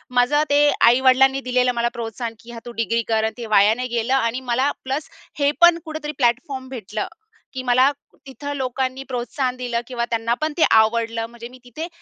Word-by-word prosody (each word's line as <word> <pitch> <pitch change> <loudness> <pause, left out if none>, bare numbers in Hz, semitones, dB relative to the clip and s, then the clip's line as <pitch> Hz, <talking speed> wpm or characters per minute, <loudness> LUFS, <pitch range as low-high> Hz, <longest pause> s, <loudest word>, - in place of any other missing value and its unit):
माझं 250 +5 +3
ते 290 +1 +4 0.2
आई-वडिलांनी 260 +2 +4
दिलेलं 250 0 +3
मला 235 0 +1
प्रोत्साहन 230 0 -5
की 235 - -13
हा, 235 - -8
तू 240 - -7
डिग्री 230 +1 0
कर 220 -1 +1
आणि 220 - -1
ते 235 - -6
वाया 205 +2 +6
नाही 250 +1 -3
गेलं 235 +3 0
आणि 245 -2 +1
मला 260 +4 +2
प्लस 270 +3 -3 0.3
हे 285 0 +3
पण 345 -1 +7
कुठेतरी 310 -1 -5
प्लॅटफॉर्म 260 +1 -1
भेटलं 215 -4 -5 0.5
की 260 -1 -5
मला 255 +2 +4 0.4
तिथं 285 +2 -6
लोकांनी 260 0 -2
प्रोत्साहन 250 +1 -2
दिलं 240 -2 -2
किंवा 240 -2 -2
त्यांना 230 0 0
पण 310 0 -1
ते 330 - +3
आवडलं 225 +1 +2
म्हणजे 235 0 -10
मी 255 - -15
तिथे 250 +7 -7
250 Hz, 190 wpm, -21 LUFS, 235-270 Hz, 0.5 s, पण